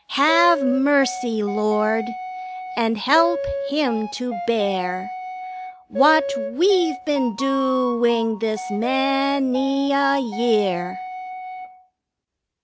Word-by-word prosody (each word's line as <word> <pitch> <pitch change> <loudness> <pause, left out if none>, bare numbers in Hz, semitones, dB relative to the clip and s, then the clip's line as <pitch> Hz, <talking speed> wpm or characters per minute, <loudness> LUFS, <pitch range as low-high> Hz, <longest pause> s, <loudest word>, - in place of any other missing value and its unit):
Have 320 +2 +4
mercy, 265 -4 +1
Lord, 215 +3 0 0.7
And 225 -1 0
help 295 +6 +3 0.3
him 255 -8 -1
to 250 -1 -5
bear 190 -5 -2 0.8
What 300 +2 +4 0.3
we've 355 +3 +2
been 280 -7 -1
doing 240 -5 0
this 225 +1 -3
many 275 +3 0
a 280 0 +2
year! 220 -8 -1
255 Hz, 75 wpm, -21 LUFS, 225-275 Hz, 0.8 s, Have